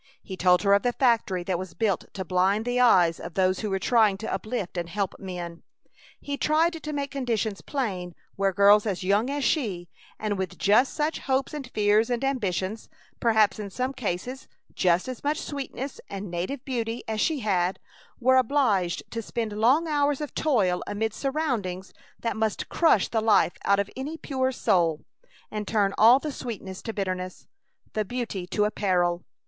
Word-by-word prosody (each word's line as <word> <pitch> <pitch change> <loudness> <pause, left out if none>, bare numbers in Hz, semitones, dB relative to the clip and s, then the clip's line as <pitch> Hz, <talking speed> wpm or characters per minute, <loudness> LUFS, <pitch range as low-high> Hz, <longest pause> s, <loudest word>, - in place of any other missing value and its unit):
He 190 - -7
told 180 0 +3
her 200 -1 +4
of 200 - +5
the 245 +2 0
factory 230 -9 +2
that 175 -1 -1
was 185 -3 -7
built 200 -1 -1
to 190 -2 -4
blind 190 +5 +1
the 245 0 0
eyes 180 -9 +5
of 165 - -8
those 185 -1 +2
who 215 - -2
were 195 - 0
trying 215 -1 +3
to 220 - -4
uplift 215 -5 -3
and 170 -1 -3
help 195 +1 -2
men. 175 -3 -6 0.6
He 285 0 -4
tried 320 +4 +2
to 310 -2 -6
make 280 -2 -3
conditions 230 -7 -2
plain 185 - -3 0.2
where 195 0 +1
girls 205 +2 +5
as 190 -3 -2
young 205 +6 +2
as 285 0 -2
she, 195 - 0 0.3
and 205 -2 -2
with 190 -1 -4
just 215 +6 +3
such 305 +2 -1
hopes 270 +2 -1
and 280 -5 -6
fears 215 +1 +2
and 245 +1 -1
ambitions, 215 -6 -2 0.3
perhaps 220 -3 +3
in 205 -1 -5
some 255 +6 -2
cases 250 +2 -4 0.3
just 180 +2 +2
as 255 -2 -6
much 300 +2 0
sweetness 275 -1 -5
and 195 -2 -6
native 185 +10 -4
beauty 235 -3 -3
as 220 -1 -1
she 310 -5 +1
had, 185 -3 +1 0.4
were 260 +1 +4
obliged 225 -9 +2
to 230 - -3
spend 225 -1 -3
long 255 +10 +3
hours 290 -2 +1
of 295 -3 -5
toil 205 -12 +1
amid 220 +1 -2
surroundings 245 - -2 0.3
that 230 - -2
must 220 -1 -1
crush 320 - +3
the 225 - 0
life 215 -5 +4
out 200 - +4
of 200 0 0
any 290 +5 -5
pure 260 -4 -1
soul, 170 -10 +1 0.5
and 210 -1 -4
turn 200 -3 +1
all 230 +4 +7
the 300 +2 -4
sweetness 205 -8 -6
to 225 - -4
bitterness, 185 -3 -4 0.5
the 215 - 0
beauty 210 -5 -4
to 210 +3 +1
a 210 - 0
peril! 175 -4 +1
215 Hz, 185 wpm, -26 LUFS, 190-255 Hz, 0.6 s, all